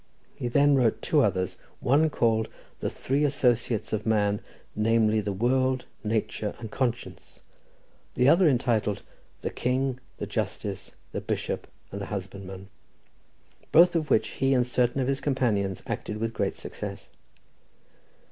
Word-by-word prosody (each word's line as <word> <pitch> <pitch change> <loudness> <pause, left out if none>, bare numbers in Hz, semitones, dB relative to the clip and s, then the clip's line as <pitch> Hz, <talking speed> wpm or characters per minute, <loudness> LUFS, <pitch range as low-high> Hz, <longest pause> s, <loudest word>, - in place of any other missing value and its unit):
He 120 - -4
then 140 +4 +4
wrote 125 -4 +2
two 150 - +3
others, 95 -5 0 0.2
one 145 +5 +3
called 110 -5 +1 0.3
"The - - -1
Three 140 +3 -1
Associates 125 -6 +1
of 105 -1 -1
Man, 105 -2 +1 0.3
namely 110 0 +3
the 105 - -2
World, 130 +5 +1 0.2
Nature, 105 -1 -1
and 115 -3 -8
Conscience;" 120 -9 -3 0.8
the 125 +1 +3
other 170 +3 +6
entitled 115 -6 +1 0.4
"The - - -2
King, 130 +1 0 0.2
the - - -3
Justice, - - -4 0.2
the - - -3
Bishop - - -3 0.2
and 100 - -5
the 100 - -4
Husbandman," 95 -1 -6 1.0
both 175 +2 +7
of 155 -2 0
which 110 0 +3
he 135 0 +1
and 125 -1 +3
certain 125 +1 +1
of 125 - 0
his 135 0 0
companions 110 -9 0
acted 105 - -4
with 115 +1 -2
great 100 -3 -1
success. - - -7
115 Hz, 140 wpm, -27 LUFS, 105-130 Hz, 1.0 s, both